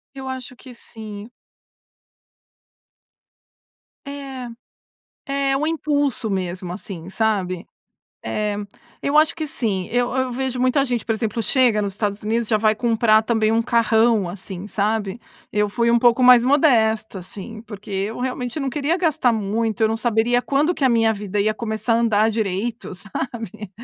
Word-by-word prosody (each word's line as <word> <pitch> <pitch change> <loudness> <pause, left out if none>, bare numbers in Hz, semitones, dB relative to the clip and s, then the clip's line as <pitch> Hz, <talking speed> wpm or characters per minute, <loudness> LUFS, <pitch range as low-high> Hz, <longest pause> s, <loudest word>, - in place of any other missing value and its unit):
Eu 265 -1 -7
acho 255 -1 -6
que 255 0 -13
sim. 220 -2 -10 2.8
É, 275 -3 -6 1.0
é 270 - +2
um 295 +3 0
impulso 290 -7 0
mesmo, 185 -2 -3
assim 180 -3 -7
sabe, 190 -4 -1 0.6
eh, 205 - -1 0.5
eu 285 +2 +2
acho 310 +1 +5
que 315 -2 -4
sim. 200 -9 -2
Eu 245 +1 +1
eu 260 -1 0
vejo 255 0 -2
muita 255 +2 +3
gente, 245 -4 -2
por 225 - 0
exemplo, 225 0 -2
chega 235 -1 +3
nos 200 -1 -2
Estados 205 0 -2
Unidos, 225 +1 -1
já 220 - +3
vai 215 0 +2
comprar 225 -1 +3
também 220 -1 +1
um 225 +1 +3
carrão, 230 -3 +3
assim 185 +1 -7
sabe. 210 0 -1 0.3
Eu 210 0 +1
fui 235 +3 +1
um 235 - +5
pouco 240 +1 +4
mais 250 -1 +8
modesta 225 -7 +2
assim, 205 +4 -8
porque 210 -2 -11
eu 200 +4 -2
realmente 250 +1 -3
não 275 -2 -1
queria 295 +6 0
gastar 310 -8 +2
muito, 220 0 -1
eu 220 - +5
não 220 - -1
saberia 235 +2 +2
quando 295 +7 +1
que - - -3
a 260 - +5
minha 225 -2 +3
vida 205 -1 -3
ia 215 +2 +2
começar 220 0 -1
a 230 - +3
andar 220 -1 +3
direito, 220 +1 -2
sabe. 210 +1 -6
225 Hz, 160 wpm, -21 LUFS, 210-250 Hz, 2.8 s, mais